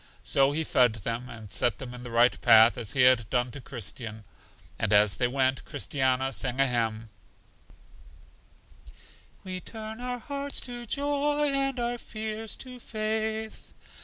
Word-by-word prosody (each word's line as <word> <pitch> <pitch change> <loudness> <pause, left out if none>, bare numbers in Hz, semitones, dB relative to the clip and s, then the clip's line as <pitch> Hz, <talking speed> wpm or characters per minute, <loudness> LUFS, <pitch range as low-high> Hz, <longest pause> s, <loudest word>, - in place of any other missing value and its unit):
So 135 0 +3
He 160 +2 -1
fed 125 -6 +3
them, 115 +4 -4
and 110 -4 -10
set 120 -5 +1
them 125 -2 -8
in 125 - -9
the 125 - -8
right 120 +1 +3
path, 110 +1 +7
as 110 - -3
He 130 - +2
had 125 -4 +5
done 125 -1 0
to 140 - -8
Christian. 115 -2 -7 0.6
And - - 0
as 105 -1 +5
they 125 - +2
went, 130 +1 +1
Christiana 130 -1 0
sang 125 +5 -1
a 135 - +5
hymn: 115 -3 -1 2.3
"We 185 -1 -5
turn 220 +2 -8
our 250 0 -3
tears 280 +3 -4
to 240 -1 -7
joy, 290 +2 0
and 275 -1 0
our 240 0 -2
fears 220 0 -5
to 250 -1 -9
faith." 220 0 -3
135 Hz, 155 wpm, -28 LUFS, -, 2.3 s, path